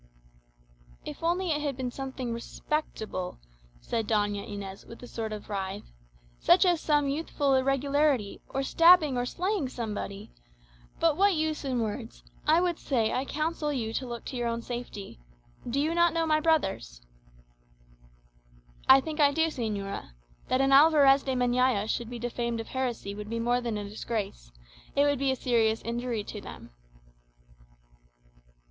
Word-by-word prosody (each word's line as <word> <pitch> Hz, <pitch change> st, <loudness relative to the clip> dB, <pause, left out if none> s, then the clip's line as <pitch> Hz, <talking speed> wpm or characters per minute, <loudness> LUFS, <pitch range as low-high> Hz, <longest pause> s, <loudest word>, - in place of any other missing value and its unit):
"If -, -, -6 dB
it -, -, -23 dB
had -, -, -3 dB
only 335 Hz, -5 st, 0 dB
been 250 Hz, -1 st, -4 dB
something 260 Hz, -2 st, -5 dB
respectable," 230 Hz, -6 st, -4 dB, 0.4 s
said 225 Hz, -2 st, -2 dB
Doña 205 Hz, -2 st, 0 dB
Inez, 195 Hz, -1 st, -7 dB
with 230 Hz, -, -12 dB
a -, -, -8 dB
sort 225 Hz, -2 st, -4 dB
of 210 Hz, -1 st, -7 dB
writhe, 195 Hz, -2 st, -4 dB, 0.6 s
"such 370 Hz, -, +5 dB
as 350 Hz, -3 st, +3 dB
some 295 Hz, -2 st, +2 dB
youthful 285 Hz, -1 st, 0 dB
irregularity, 275 Hz, -3 st, +1 dB
or 270 Hz, -, -2 dB
stabbing 330 Hz, -1 st, +6 dB
or 245 Hz, 0 st, -1 dB
slaying 365 Hz, -4 st, -1 dB
somebody! 210 Hz, -, -5 dB, 0.7 s
but 325 Hz, -3 st, +3 dB
what 395 Hz, 0 st, +4 dB
use 310 Hz, -1 st, -1 dB
in 255 Hz, -3 st, -1 dB
words? 225 Hz, +2 st, -5 dB, 0.2 s
I 315 Hz, +2 st, +6 dB
would 350 Hz, -2 st, 0 dB
say, 230 Hz, -6 st, 0 dB
I 260 Hz, -, -1 dB
counsel 305 Hz, +1 st, -2 dB
you 225 Hz, -5 st, -2 dB
to 260 Hz, -, -3 dB
look 235 Hz, -1 st, -6 dB
to -, -, -6 dB
your 240 Hz, -1 st, -1 dB
own 230 Hz, 0 st, -2 dB
safety. 240 Hz, -, -7 dB, 0.5 s
Do 265 Hz, +4 st, 0 dB
you 310 Hz, +3 st, +1 dB
not 340 Hz, -1 st, +3 dB
know 330 Hz, -1 st, +1 dB
my 310 Hz, -1 st, +3 dB
brothers?" 190 Hz, -, 0 dB, 1.9 s
"I 265 Hz, +1 st, +9 dB
think 315 Hz, +2 st, -6 dB
I 285 Hz, -1 st, +6 dB
do, 320 Hz, +3 st, +2 dB
señora. 205 Hz, -, -4 dB, 0.3 s
That 255 Hz, +1 st, +2 dB
an 270 Hz, 0 st, +2 dB
Alvarez 280 Hz, -1 st, +7 dB
de 265 Hz, -1 st, -2 dB
Meñaya 250 Hz, -3 st, +2 dB
should 230 Hz, +1 st, -2 dB
be 245 Hz, -, -6 dB
defamed 235 Hz, 0 st, -3 dB
of 225 Hz, -, -6 dB
heresy 245 Hz, -6 st, -3 dB
would 210 Hz, +1 st, -7 dB
be 230 Hz, -, -2 dB
more 240 Hz, +2 st, +1 dB
than 235 Hz, -3 st, -2 dB
a 205 Hz, -1 st, -5 dB
disgrace 200 Hz, -, -5 dB, 0.4 s
it 280 Hz, -, +4 dB
would 285 Hz, -2 st, +2 dB
be 275 Hz, 0 st, +1 dB
a 265 Hz, -, +2 dB
serious 225 Hz, -3 st, +2 dB
injury 235 Hz, -1 st, -2 dB
to -, -, -7 dB
them." -, -, -11 dB
255 Hz, 160 wpm, -28 LUFS, 225-295 Hz, 1.9 s, I